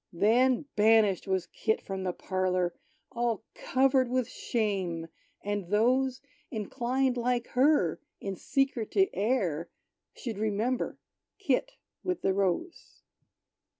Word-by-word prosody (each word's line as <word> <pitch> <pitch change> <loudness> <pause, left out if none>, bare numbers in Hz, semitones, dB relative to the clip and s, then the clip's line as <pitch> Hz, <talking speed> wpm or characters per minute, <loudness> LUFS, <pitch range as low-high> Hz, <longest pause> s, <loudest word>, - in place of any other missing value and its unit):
Then, 245 - +3
banished 210 -3 +4
was 190 -2 0
Kit 220 - -1
from 195 -1 -5
the 185 -1 -1
parlor, 185 -1 -1 0.4
All 235 -2 -1
covered 260 -1 +2
with 255 -1 0
shame! 190 -10 -2 0.3
And 205 -3 -2
those 250 +6 +2 0.3
Inclined, 245 +3 -1
like 240 0 0
her, 250 - +3 0.2
in 195 -1 -4
secret 265 -1 0
to 390 -1 +3
err, 190 - 0 0.5
Should 225 -5 -5
remember 220 +4 -1 0.4
Kit 395 - 0 0.3
with 365 0 -2
the 190 - +3
Rose. 200 - -2
220 Hz, 115 wpm, -29 LUFS, 190-255 Hz, 0.5 s, banished